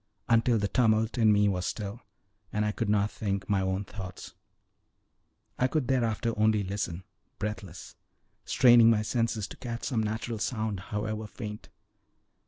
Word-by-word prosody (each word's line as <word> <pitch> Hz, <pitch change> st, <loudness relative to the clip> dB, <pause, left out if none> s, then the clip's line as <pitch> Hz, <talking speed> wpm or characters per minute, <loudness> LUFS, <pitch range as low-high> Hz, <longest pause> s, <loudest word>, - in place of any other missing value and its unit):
until 115 Hz, +1 st, +4 dB
the 100 Hz, -1 st, 0 dB
tumult 110 Hz, +1 st, +2 dB
in 110 Hz, -2 st, +5 dB
me 105 Hz, 0 st, +4 dB
was 90 Hz, -3 st, 0 dB
still, 105 Hz, +4 st, -4 dB, 0.5 s
and 105 Hz, 0 st, 0 dB
I 105 Hz, -, +1 dB
could 110 Hz, 0 st, -2 dB
not 105 Hz, 0 st, +2 dB
think 100 Hz, -2 st, -3 dB
my 100 Hz, -2 st, +2 dB
own 95 Hz, +1 st, -1 dB
thoughts. 95 Hz, -3 st, -8 dB, 1.3 s
I 125 Hz, -, +4 dB
could 140 Hz, -1 st, -1 dB
thereafter 115 Hz, -2 st, 0 dB
only 110 Hz, -1 st, +3 dB
listen, 95 Hz, -2 st, -3 dB, 0.3 s
breathless, 100 Hz, -5 st, -6 dB, 0.5 s
straining 120 Hz, -3 st, +6 dB
my 110 Hz, -2 st, +3 dB
senses 115 Hz, -2 st, -1 dB
to -, -, -10 dB
catch 120 Hz, -2 st, -6 dB
some 120 Hz, -5 st, 0 dB
natural 110 Hz, +1 st, -3 dB
sound, 110 Hz, -3 st, -2 dB
however 110 Hz, +1 st, -3 dB
faint. 105 Hz, -1 st, -8 dB
110 Hz, 150 wpm, -29 LUFS, 100-115 Hz, 1.3 s, straining